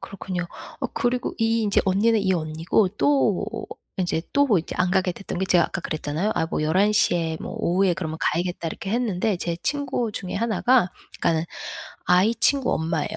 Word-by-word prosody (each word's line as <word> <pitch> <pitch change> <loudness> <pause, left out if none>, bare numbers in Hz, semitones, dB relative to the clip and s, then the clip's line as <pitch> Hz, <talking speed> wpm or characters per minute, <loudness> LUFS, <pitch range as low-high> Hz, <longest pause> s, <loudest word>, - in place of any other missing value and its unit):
그렇군요. 185 -3 -5 0.3
어 - - 0
그리고 245 +1 -1
이 225 0 +2
인제 205 -2 +3
언니는 210 +4 +3
이 190 -1 +2
언니고 165 +4 +1
또 275 -9 +1 0.3
인제 175 -3 0
또 285 0 +3
이제 160 - -6
안 180 0 +2
가게 185 -1 +2
됐던 190 0 -6
게 190 - +1
제가 175 -3 +4
아까 - - -3
그랬잖아요. 155 +7 -2
'아 160 - +1
뭐 160 - -2
11 185 +7 +3
시에 175 -6 +2
뭐 - - -6
오후에 180 +1 +2
그러면 160 -2 -4
가야겠다.' 175 +1 -1
이렇게 190 - -6
했는데 215 -3 0
제 170 -1 -3
친구 270 -5 -1
중에 185 -3 -5
1 215 -1 -1
가 245 -7 +4 0.3
그러니까는 165 -1 +2 0.6
아이 185 +6 +4
친구 275 -3 +2
엄마예요. 160 -1 -2
190 Hz, 360 characters per minute, -24 LUFS, 170-220 Hz, 0.6 s, 제가